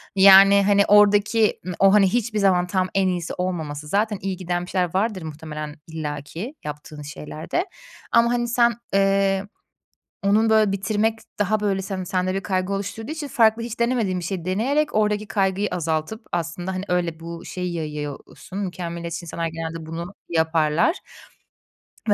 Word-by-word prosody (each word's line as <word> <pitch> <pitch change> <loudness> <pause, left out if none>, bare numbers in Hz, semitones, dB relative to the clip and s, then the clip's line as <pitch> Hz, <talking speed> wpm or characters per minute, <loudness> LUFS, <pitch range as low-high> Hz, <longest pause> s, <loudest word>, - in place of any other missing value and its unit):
yani, 195 +1 +8
hani, 200 0 +4
oradaki 210 +1 +4
m 180 - -4
o, 195 0 +6
hani, 200 -2 +6
hiçbir 230 -2 0
zaman 180 -3 +3
tam 185 0 0
en 195 -1 +3
iyisi 175 -2 -2
olmaması 160 -5 -4
zaten 210 +2 0
iyi 190 -1 -3
giden 175 -1 -2
bir - - -12
şeyler 180 -3 0
vardır 200 -2 0
muhtemelen 150 -1 -7
illa 150 -3 -4
ki 200 - -7
yaptığın 150 0 -7
şeylerde 155 - -4 0.5
ama, 235 0 +5
hani, 240 0 0
sen, 235 0 +3 0.2
eee, 195 0 +2 0.8
onun, 215 +3 +3
böyle, 215 -2 +4
bitirmek 220 +3 0 0.2
daha, 210 +1 +1
böyle, 195 -2 0
sen 185 -1 -4
sende 185 0 -1
bir 195 - -1
kaygı 185 0 -1
oluşturduğu 220 +7 -4
için 310 -2 -5
farklı 225 -2 +3
hiç 230 -1 -6
denemediğin 235 -7 +1
bir - - -7
şeyi 175 -2 -4
deneyerek 265 +11 0
oradaki 210 0 +1
kaygıyı 195 +1 0
azaltıp 165 +6 -2
aslında, 175 +2 -3
hani, 185 +1 -3
öyle 175 -2 -1
bu 170 +1 -8
şeyi 180 -1 -4
yayıyorsun. 150 +4 -6
Mükemmeliyetçi 170 -3 -4
insanlar 165 0 -3
genelde 165 0 -6
bunu 170 +4 -6
yaparlar 160 - +2 1.1
ve - - +6
190 Hz, 160 wpm, -23 LUFS, 170-210 Hz, 1.1 s, yani